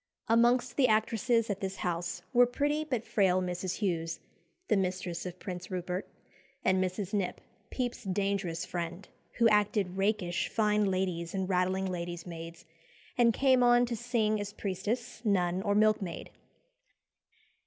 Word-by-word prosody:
Amongst 240 +2 +3
the 265 -3 +5
actresses 225 +1 +2
at 200 - -3
this 195 -1 -3
house 175 -1 -3
were 245 0 +6
pretty 290 +5 0
but 250 -7 -2
frail 185 -3 +3
Mrs. 180 0 -2
Hughes, 165 -5 -2 0.5
the 215 - +3
mistress 185 -2 -2
of 180 0 -7
Prince 180 -1 -6
Rupert, 180 0 -3 0.6
and 190 0 +3
Mrs. 185 +2 -3
Knipp, 195 -3 -1 0.3
Pepys's 245 -4 -3
dangerous 195 -3 -1
friend, 175 +2 -5 0.3
who 235 - +4
acted 205 -3 +1
rakish 195 -3 0
fine 210 -1 +2
ladies 185 -2 -2
and 190 -1 -1
rattling 185 +1 +1
ladies' 175 -2 -4
maids, 170 0 -8 0.5
and 240 -1 +5
came 260 +2 +3
on 240 0 +5
to 240 -1 -3
sing 220 -2 0
as 205 0 -5
priestess, 210 +4 -3
nun, 185 -4 +1
or 205 0 +1
milkmaid. 210 -4 +1
195 Hz, 145 wpm, -30 LUFS, 180-225 Hz, 0.6 s, were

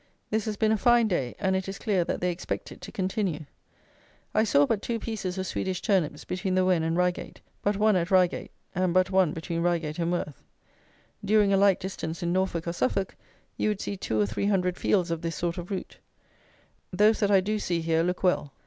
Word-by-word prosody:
This 220 -1 0
has 215 -2 -3
been 220 0 +2
a 220 - +3
fine 240 +2 +4
day; 135 - -1
and 190 -2 0
it 190 0 -2
is 195 - -5
clear 200 -6 +1
that - - -3
they 180 0 +1
expect 175 - -5
it - - -12
to - - -8
continue. 190 -4 -2 0.9
I 215 - +3
saw 145 -9 +4
but 205 +6 0
two 235 +1 -2
pieces 210 -5 -4
of 190 - -2
Swedish 185 -1 -2
turnips 175 -8 0
between 185 +1 -2
the 185 0 +3
Wen 180 -3 +3
and 165 +1 0
Reigate, 180 0 -1 0.2
but 205 0 0
one 215 0 +4
at 175 -1 0
Reigate, 185 -2 +2 0.2
and 180 -1 0
but 185 +1 +3
one 185 -4 +3
between 165 +1 -3
Reigate 170 -2 -1
and 170 0 0
Worth. 150 -6 -3 0.8
During 205 -1 +3
a - - +4
like 195 -1 +4
distance 175 -2 -5
in 170 0 0
Norfolk 185 -3 -1
or 170 - -1
Suffolk, 175 +6 -1 0.4
you - - +1
would 210 -2 -2
see 200 - -3
two 110 - -2
or 105 - +4
three 110 - -2
hundred 180 -3 +1
fields 185 -4 +1
of 165 -1 -2
this 165 -1 -3
sort 170 +3 -2
of 175 - -7
root. 195 -2 -5 0.9
Those 210 +4 +4
that 205 - +2
I 195 -1 +6
do 210 +3 -1
see 175 -4 -1
here 165 0 +1
look 180 +2 -2
well. 165 -6 +1
185 Hz, 220 wpm, -27 LUFS, 170-200 Hz, 0.9 s, I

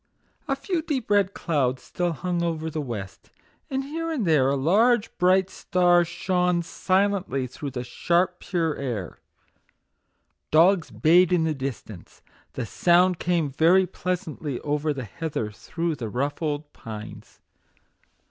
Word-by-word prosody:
A 275 - +1
few 320 +5 -2
deep 270 -9 -3
red 200 -1 +3
clouds 130 -6 0
still 175 -1 -2
hung 175 +2 -2
over 160 -1 -2
the 155 0 -3
west, 105 -8 -7 0.4
and 270 0 -1
here 325 +4 -4
and 265 -10 -1
there 150 -6 +4
a 140 - +1
large 210 - +2
bright 185 +1 +4
star 175 -1 +3
shone 180 0 0
silently 190 -7 0
through 135 +3 -6
the 125 -2 -5
sharp, 175 +8 0
pure 165 -4 -1
air. 115 -10 -4 1.3
Dogs 170 +2 +4
bayed 175 +3 +4
in 175 -3 +3
the 160 -1 +1
dis 135 -3 -4
tance; 100 -6 -13 0.3
the 125 - -3
sound 175 - +3
came 170 -5 0
very 170 +7 +4
pleasantly 175 -7 -4
over 150 +1 -1
the 135 -3 -4
heather 115 -2 -4
through 165 +10 -3
the 120 -7 -5
rough 140 +8 -2
old 150 -1 -3
pines. 110 -1 -10
165 Hz, 145 wpm, -25 LUFS, 140-185 Hz, 1.3 s, there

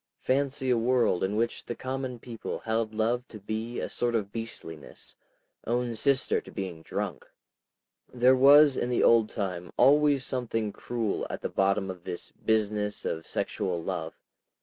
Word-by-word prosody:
Fancy 135 0 0
a 120 - +3
world 120 -5 +2
in 95 +2 0
which 115 +2 -1
the 120 - -5
common 130 -1 -4
people 115 -1 -6
held 110 -1 -1
love 115 +3 0
to 110 - -10
be 110 +4 -4
a - - -2
sort 120 -1 -1
of 100 -3 -1
beastliness, 100 -9 -8 0.5
own 120 0 0
sister 135 +4 +1
to - - -14
being 95 -5 -5
drunk!... - - -5 0.8
There 125 +1 +5
was 140 +2 +7
in 120 - -1
the 125 - +2
old 115 -2 +5
time 90 -5 -4
always 145 -1 +5
something 115 -5 -2
cruel 115 -4 -2
at - - -5
the - - -3
bottom 95 0 +1
of 90 -2 -11
this 85 - -6
business 105 -1 -1
of 80 0 -3
sexual 90 -3 -2
love. - - -4
115 Hz, 160 wpm, -28 LUFS, 105-125 Hz, 0.8 s, was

